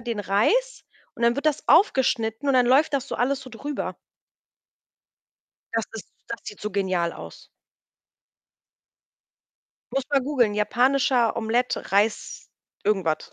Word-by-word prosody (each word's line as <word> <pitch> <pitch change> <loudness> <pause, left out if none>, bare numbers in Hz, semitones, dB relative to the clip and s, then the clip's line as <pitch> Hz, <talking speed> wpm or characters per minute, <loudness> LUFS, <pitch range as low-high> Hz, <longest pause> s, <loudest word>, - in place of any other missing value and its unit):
den 235 -2 -4
Reis 315 - +1 0.3
und 235 - -8
dann 235 +1 +3
wird 280 - -3
das 305 -4 0
aufgeschnitten 265 - +2
und 270 - +3
dann 250 -1 +4
läuft 280 +4 +3
das 275 -1 -1
so - - -5
alles 265 +3 0
so 255 - -11
drüber. 285 +5 -5 1.8
Das 225 -1 0
ist 225 -2 -8 0.2
das 230 - -5
sieht 210 - -9
so 210 - -4
genial 185 -4 -1
aus. - - -11 2.5
Musst 270 0 -1
du 285 - +2
mal 270 - +3
googeln: 250 -7 +1
„Japanischer 245 +2 +2
Omelette, 230 +1 -1
Reis“ 205 +2 0 0.4
irgendwas. 190 -7 0
240 Hz, 135 wpm, -24 LUFS, 210-275 Hz, 2.5 s, dann